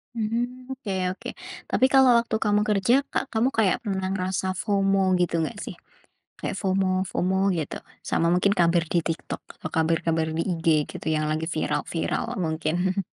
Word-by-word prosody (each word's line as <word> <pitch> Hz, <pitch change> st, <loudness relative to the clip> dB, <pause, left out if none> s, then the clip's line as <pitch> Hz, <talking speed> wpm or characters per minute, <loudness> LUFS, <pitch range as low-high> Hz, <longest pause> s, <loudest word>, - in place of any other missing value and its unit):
Mmm, 240 Hz, +3 st, -2 dB
oke 255 Hz, -6 st, -6 dB, 0.2 s
oke. -, -, -8 dB, 0.4 s
Tapi 260 Hz, -, +3 dB
kalau 265 Hz, -1 st, +7 dB
waktu 235 Hz, -1 st, 0 dB
kamu 210 Hz, -1 st, +3 dB
kerja 205 Hz, +3 st, +3 dB, 0.2 s
ka -, -, +3 dB
kamu 225 Hz, +3 st, +3 dB
kayak 205 Hz, -5 st, +3 dB
pernah 190 Hz, -2 st, -1 dB
ngerasa 185 Hz, -1 st, -2 dB
FOMO 195 Hz, -2 st, +2 dB
gitu 175 Hz, -1 st, +1 dB
nggak 215 Hz, -, -6 dB
sih? -, -, -7 dB, 0.6 s
Kayak -, -, -3 dB
FOMO-FOMO 190 Hz, -1 st, 0 dB, 0.2 s
gitu, 155 Hz, -3 st, -3 dB, 0.3 s
sama 165 Hz, -, +1 dB
mungkin 190 Hz, +3 st, +3 dB
kabar 170 Hz, 0 st, +4 dB
di -, -, +2 dB
TikTok 165 Hz, 0 st, -4 dB, 0.2 s
atau 160 Hz, -, -5 dB
kabar-kabar 160 Hz, 0 st, +1 dB
di -, -, +1 dB
IG 165 Hz, 0 st, -6 dB, 0.2 s
gitu -, -, -8 dB
yang 155 Hz, 0 st, 0 dB
lagi 155 Hz, +1 st, -1 dB
viral-viral -, -, -1 dB
mungkin? 175 Hz, +3 st, 0 dB
190 Hz, 155 wpm, -25 LUFS, 170-210 Hz, 0.6 s, kalau